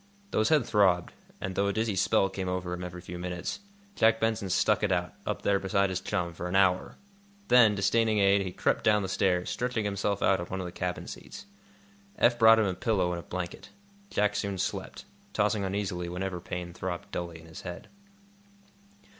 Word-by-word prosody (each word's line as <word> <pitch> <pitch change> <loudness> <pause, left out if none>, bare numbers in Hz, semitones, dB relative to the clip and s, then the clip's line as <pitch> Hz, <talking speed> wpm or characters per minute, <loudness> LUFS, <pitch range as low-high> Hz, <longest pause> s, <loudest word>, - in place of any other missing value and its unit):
Though - - +1
his 110 - +3
head 150 -6 +4
throbbed, 95 -6 +2 0.3
and 95 - -4
though 100 +1 +1
a 100 - 0
dizzy 110 -1 0
spell 95 +1 +3
came 95 -1 -4
over 90 -1 -2
him 90 0 -5
every 90 0 -7
few 90 0 -8
minutes, 90 -1 -4 0.4
Jack 115 0 +4
Benson 110 -3 0
stuck 105 +4 +2
it 105 -2 +1
out, 90 -1 0
up - - -2
there 100 -1 +2
beside 100 0 +1
his 95 0 -2
chum, 90 -4 -2
for 85 +2 -5
an 90 - -3
hour. 95 -2 +3 0.5
Then, 115 -4 +6
disdaining 110 +3 +2
aid, 100 0 +4
he 95 -2 -3
crept - - 0
down 105 -1 +3
the - - -2
stairs, 90 -1 +1
stretching 120 -3 -1
himself 100 0 -1
out 95 - +3
on 85 - -5
one 95 - -4
of 95 - -4
the 90 - -6
cabin 90 0 -3
seats. - - -9 0.7
Eph 120 0 +3
brought 115 0 +8
him 110 - +3
a 95 - 0
pillow 95 -3 0
and 85 - -3
a - - -9
blanket. 90 -1 -6 0.4
Jack 105 0 +1
soon 100 -2 -2
slept, - - -4 0.3
tossing 105 0 +1
uneasily 95 -3 -2
whenever 90 +1 -3
pain 90 -1 -5
throbbed 95 +3 -5
dully 85 -1 -5
in 80 - -15
his 80 -1 -10
head. 90 -1 -8
95 Hz, 205 wpm, -29 LUFS, 90-105 Hz, 0.7 s, brought